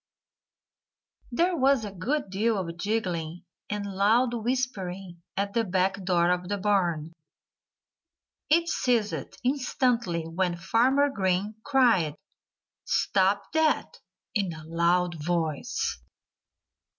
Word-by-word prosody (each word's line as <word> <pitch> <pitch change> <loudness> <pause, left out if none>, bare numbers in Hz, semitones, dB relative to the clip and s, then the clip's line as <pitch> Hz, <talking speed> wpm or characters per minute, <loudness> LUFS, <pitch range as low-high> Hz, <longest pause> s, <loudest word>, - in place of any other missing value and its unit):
There 345 +8 +2
was 270 -5 +3
a 205 - -6
good 200 +4 -2
deal 215 +3 +1
of 170 -3 -4
giggling 180 -5 -2 0.3
and 210 -1 -3
loud 210 +6 +2
whispering 195 -8 -3 0.2
at 200 0 -1
the 230 - +2
back 190 0 0
door 175 -1 +2
of 180 0 -1
the 205 - 0
barn. 175 -6 0 1.4
It 335 +2 +4
ceased 235 -9 -1
instantly 245 - 0
when 175 +2 -1
Farmer 255 +10 +3
Green 190 -1 0
cried 230 - +3 0.7
"Stop 195 +1 +1
that!" 315 -1 +1 0.3
in 195 -4 0
a 160 0 -10
loud 170 0 +1
voice. 160 -3 -1
195 Hz, 105 wpm, -27 LUFS, 175-235 Hz, 1.4 s, It